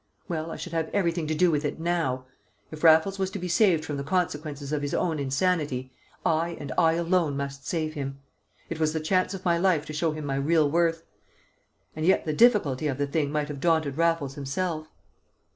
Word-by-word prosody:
Well, 160 -1 -3
I - - -5
should - - -7
have 160 -1 -1
everything 170 -4 0
to 155 - -1
do 175 +2 +4
with 150 -1 0
it 150 - -3
now; 160 -7 -1 0.5
if 155 0 -9
Raffles 165 +5 +5
was 190 -1 0
to 190 - -6
be 180 -1 -4
saved 175 -3 +3
from 145 -2 -4
the 140 - -3
consequences 150 -3 -2
of 150 - 0
his 145 -1 -2
own 160 -4 0
insanity, 140 -2 -1 0.3
I 165 +1 +1
and 140 -2 -6
I 165 -2 +4
alone 170 -3 +1
must 140 -1 -5
save 155 -2 -1
him. 135 -2 -5 0.5
It 165 - -5
was 155 -1 +1
the 160 - -1
chance 185 +4 +1
of 185 - -9
my 170 -1 +3
life 175 -5 +2
to 155 - -7
show 160 +1 0
him 155 -1 -6
my 135 -1 -1
real 155 +2 +3
worth. 165 +1 +1 0.9
And 155 - -4
yet 185 +4 +3
the 155 - -1
difficulty 155 - +3
of 135 -3 -2
the 145 - 0
thing 145 0 -1
might 150 0 -1
have 145 -2 -5
daunted 160 -3 +1
Raffles 165 -4 +1
himself. 155 +3 -3
155 Hz, 210 wpm, -26 LUFS, 145-170 Hz, 0.9 s, Raffles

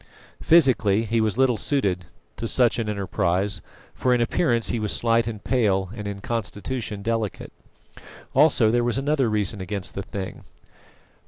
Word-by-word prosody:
Physically 125 -10 +4
he 115 +1 +1
was 110 0 0
little 130 -3 +3
suited 100 -10 -1 0.3
to 115 - -3
such 120 0 +3
an 110 -2 -2
enterprise, 95 -2 -1 0.3
for 125 -1 +1
in - - 0
appearance 120 -1 +1
he 120 - -1
was 105 -1 -1
slight 115 -1 +2
and 110 -3 -6
pale, 95 -7 +1
and 105 -3 -6
in 100 -1 -6
constitution 110 -1 -4
delicate. 110 -3 -3 0.8
Also, 110 - +4
there 120 +1 +2
was 120 +1 0
another 135 -3 +1
reason 105 -1 0
against 95 +1 -4
the 100 - -4
thing. 95 -1 -7
110 Hz, 155 wpm, -24 LUFS, 100-120 Hz, 0.8 s, Physically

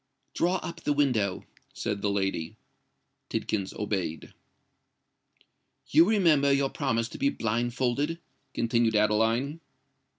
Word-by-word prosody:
"Draw 180 +2 +1
up 170 - -6
the 145 - +1
window," 120 -10 +1 0.3
said 100 -1 -3
the 105 - +1
lady. 95 -5 -2 0.7
Tidkins 100 -3 -2
obeyed. 95 -7 -3 1.6
"You 165 - +7
remember 160 -10 +4
your 140 0 +2
promise 115 -5 -1
to - - -9
be 280 +1 +3
blindfolded?" 120 - -1 0.4
continued 115 -1 +1
Adeline. 115 +8 +2
120 Hz, 105 wpm, -28 LUFS, 105-145 Hz, 1.6 s, You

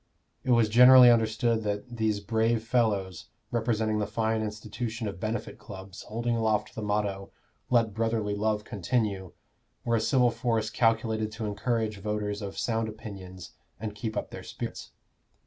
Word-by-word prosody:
It 130 - -4
was 115 -3 +5
generally 125 +2 +9
understood 115 0 +2
that 105 +3 -4
"these 110 -2 0
brave 115 +1 +1
fellows," 105 -7 0 0.2
representing 110 -2 0
the 105 - -1
fine 110 0 0
institution 110 +2 -4
of 100 -3 -6
Benefit 110 +2 -4
Clubs, 95 -2 -10
holding 120 +2 -1
aloft 110 -2 0
the - - -6
motto, 105 -2 -1 0.4
"Let 115 -4 +3
brotherly 110 -1 0
love 105 0 0
continue," 100 -3 -2 0.5
were 115 -1 +2
a - - 0
civil 125 0 +3
force 115 -2 -1
calculated 110 -1 +1
to 110 0 -4
encourage 105 0 -1
voters 105 0 -3
of 100 -1 -6
sound 115 +2 0
opinions 95 -5 -9 0.3
and 105 0 -4
keep 110 +1 -4
up - - -3
their - - -7
spirits. - - -7
110 Hz, 150 wpm, -28 LUFS, 105-115 Hz, 0.5 s, generally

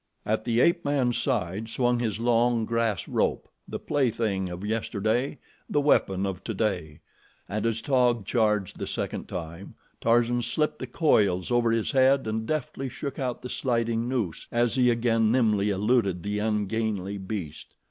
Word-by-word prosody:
At 110 +1 -1
the 120 0 +2
ape 170 +3 +3
man's 135 -4 +1
side 110 -4 -1
swung 120 +1 +1
his 110 -3 -1
long 120 -1 +2
grass 115 -4 -1
rope - - 0 0.2
the - - -4
play 140 -4 +1
thing 100 -5 -1
of 90 +3 -6
yesterday, 110 +5 -1 0.3
the 145 - +2
weapon 100 -9 +2
of 95 -1 -4
today 95 -9 -2 0.5
and 105 +2 -1
as 115 0 -1
Taug 125 -5 +2
charged 105 -4 0
the - - -3
second - - -3
time, 85 +2 -7 0.3
Tarzan 120 +1 +3
slipped 150 +6 -1
the 130 - -5
coils 105 - +2
over 120 -1 +3
his 115 -1 0
head 135 0 +4
and 110 0 -2
deftly 135 -3 -2
shook 140 +2 -6
out 125 -3 -3
the 125 - -5
sliding 115 -2 0
noose 115 -10 -2
as 120 0 +2
he 125 -2 +3
again 115 -2 +2
nimbly 105 -5 +2
eluded 100 -2 +1
the 105 0 -2
ungainly 105 -2 -1
beast. 95 -7 -6
115 Hz, 160 wpm, -27 LUFS, 100-120 Hz, 0.5 s, head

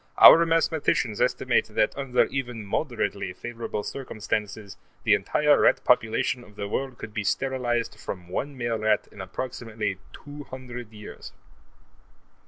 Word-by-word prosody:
Our 165 +1 +9
mathematicians 160 -9 +1
estimate - - +2
that 110 - 0
under 135 -3 +2
even 125 -5 -4
moderately 95 -2 -2
favorable 115 +1 -5
circumstances, 105 -5 -4 0.3
the - - +4
entire - - +3
rat - - +4
population 110 +3 +2
of 105 -3 -17
the 100 -1 -4
world 130 +4 -3
could 110 - -8
be 105 - -2
sterilized 120 +1 -1
from 90 -2 -6
one 135 +10 -4
male 120 -2 -1
rat 110 -1 +1
in 105 - -9
approximately 110 -1 -4
two 145 0 -10
hundred 125 -3 -8
years. 105 -1 -10
115 Hz, 135 wpm, -26 LUFS, 105-130 Hz, 0.3 s, Our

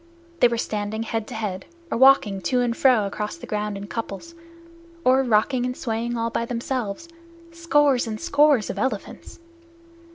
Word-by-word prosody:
They - - +6
were 235 0 -2
standing 215 0 -3
head 225 -1 -3
to 245 - -8
head, 200 -4 -4 0.3
or - - 0
walking 255 -7 +5
to 250 +6 0
and 240 -1 0
fro 245 -6 +4
across 210 +1 -4
the - - -10
ground 210 -1 -3
in 200 - -7
couples, 230 +9 -6 0.7
or 260 +1 +5
rocking 245 +1 +1
and 250 0 -3
swaying 235 0 -3
all 230 0 -1
by 230 - -1
themselves 245 +2 -3 0.4
scores 295 -7 +2
and 215 -1 -4
scores 295 - +3
of 195 - -7
elephants. 265 +6 -4
235 Hz, 165 wpm, -23 LUFS, 210-265 Hz, 0.7 s, They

